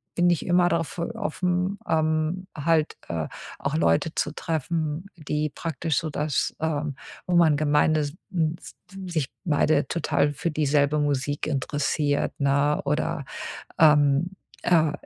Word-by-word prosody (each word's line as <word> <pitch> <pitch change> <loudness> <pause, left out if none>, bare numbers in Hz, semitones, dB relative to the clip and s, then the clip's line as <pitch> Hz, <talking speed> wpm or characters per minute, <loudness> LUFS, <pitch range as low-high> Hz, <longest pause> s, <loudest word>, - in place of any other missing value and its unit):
bin 175 0 +4
ich 175 -3 +1
immer 175 0 +4
drauf 165 +1 -1 0.2
offen, 185 -1 -1
ähm, 160 +3 0
halt, 155 +1 +1
äh, 80 -2 -2 0.3
auch - - -2
Leute 85 - +2
zu - - -1
treffen, 160 +1 -2
die 150 -2 -2
praktisch 160 -1 -2
so 160 - 0
das, 150 0 -1
ähm 150 -3 -1 0.3
wo 180 - +1
man 160 -4 +5
gemeine 155 +1 +3
s 145 -1 -2 0.2
n 160 -2 +1
s - - -12 0.3
s 175 - -6
sich 155 -6 0 0.2
beide 150 -2 +2
total 145 -3 +1
für 165 +4 -2
dieselbe 150 0 +2
Musik 145 0 -1
interessiert, 145 0 0
ne 140 +1 +2
oder, 150 +1 -1 0.6
ähm, 150 +2 +5 0.3
äh, 160 -3 +4
155 Hz, 140 wpm, -25 LUFS, 145-165 Hz, 0.6 s, man